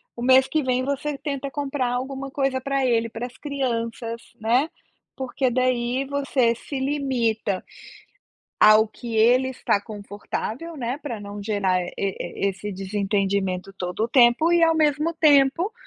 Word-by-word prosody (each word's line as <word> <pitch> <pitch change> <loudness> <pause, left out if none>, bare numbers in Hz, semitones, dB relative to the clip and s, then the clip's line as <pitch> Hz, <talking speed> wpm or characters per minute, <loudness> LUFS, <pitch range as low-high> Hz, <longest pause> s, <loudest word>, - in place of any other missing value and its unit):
o 240 - -6
mês 260 +1 +6
que 310 -2 0
vem 255 0 +1
você 280 +2 -2
tenta 280 -2 -4
comprar 270 -3 -2
alguma 270 +2 -4
coisa 270 -2 0
para 275 +1 -1
ele, 230 -1 +2
para 230 +2 -5
as 250 - -17
crianças, 230 -5 -3 0.2
né. 245 +7 +2 0.5
Porque, 260 0 -1
daí, 255 +1 0
você 275 -4 +1
se 265 +3 -6
limita, 245 -8 -1 1.0
ao 215 +1 +7
que 230 +1 -7
ele 245 +4 +4
está 235 -5 0
confortável, 215 +9 -6
né, 250 +2 -3
para 250 -8 -5
não 205 0 -8
gerar 200 -3 +1
e 175 - -6
e 200 0 -2
esse 195 +2 -7
desentendimento 195 -1 -1
todo 180 +2 -4
o - - -2
tempo, 250 +6 +5
e 345 -1 +4
ao 325 0 +5
mesmo 305 +2 +1
tempo 305 +4 +4
250 Hz, 150 wpm, -24 LUFS, 220-275 Hz, 1.0 s, ao